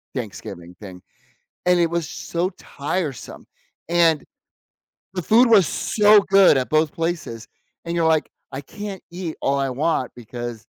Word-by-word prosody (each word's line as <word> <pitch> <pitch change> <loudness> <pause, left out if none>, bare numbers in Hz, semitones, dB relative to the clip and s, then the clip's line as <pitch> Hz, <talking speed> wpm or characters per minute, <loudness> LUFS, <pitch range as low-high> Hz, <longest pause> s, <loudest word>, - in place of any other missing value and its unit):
Thanksgiving 100 -7 -7
thing. 90 -3 -10 0.6
And 180 -1 +4
it 170 -1 +2
was 170 -2 -2
so 175 +2 -3
tiresome, 145 -1 -5 0.4
and 165 -3 +3 0.9
the 180 - -2
food 235 +8 +5
was 200 -6 +6
so 210 -1 +4
good 195 -6 +6
at 125 - -3
both 155 -1 +2
places, 165 -9 -4 0.4
and 170 - -4
you're, 165 -1 +2
like, 155 -3 +1 0.2
"I 135 +2 -5
can't 205 +3 -8
eat 175 -2 -6
all 140 0 +1
I 135 -1 0
want 140 -1 -1
because" 120 0 -7
160 Hz, 145 wpm, -22 LUFS, 125-180 Hz, 0.9 s, was